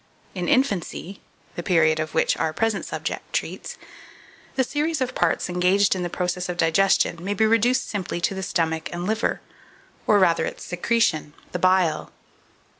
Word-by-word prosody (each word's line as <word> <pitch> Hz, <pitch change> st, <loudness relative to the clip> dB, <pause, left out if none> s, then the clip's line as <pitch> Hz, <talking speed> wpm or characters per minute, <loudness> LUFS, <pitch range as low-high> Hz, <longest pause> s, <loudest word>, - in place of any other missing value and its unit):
In 180 Hz, -2 st, -3 dB
infancy 200 Hz, -, 0 dB, 0.3 s
(the -, -, -4 dB
period 160 Hz, -3 st, +3 dB
of 155 Hz, 0 st, -4 dB
which 160 Hz, -, +3 dB
our 160 Hz, -1 st, -1 dB
present 225 Hz, +2 st, 0 dB
subject -, -, -5 dB
treats), -, -, -3 dB, 0.8 s
the 265 Hz, -, +3 dB
series 305 Hz, +5 st, -1 dB
of 255 Hz, -1 st, -1 dB
parts -, -, +1 dB
engaged 180 Hz, +3 st, +3 dB
in 185 Hz, -, -3 dB
the 175 Hz, -, -2 dB
process 180 Hz, +1 st, -2 dB
of 175 Hz, -, -3 dB
digestion 170 Hz, 0 st, +2 dB
may 200 Hz, +2 st, -2 dB
be 220 Hz, -, +3 dB
reduced 230 Hz, +3 st, +2 dB
simply 190 Hz, -4 st, -3 dB
to 185 Hz, -, +1 dB
the 190 Hz, -, -4 dB
stomach 160 Hz, -3 st, -1 dB
and 175 Hz, +1 st, -4 dB
liver, 220 Hz, +3 st, -1 dB, 0.7 s
or 210 Hz, -, +5 dB
rather 175 Hz, -4 st, +3 dB
its -, -, -5 dB
secretion, 180 Hz, -5 st, 0 dB, 0.2 s
the 180 Hz, -, -3 dB
bile. 185 Hz, -3 st, +2 dB
185 Hz, 165 wpm, -24 LUFS, 170-210 Hz, 0.8 s, or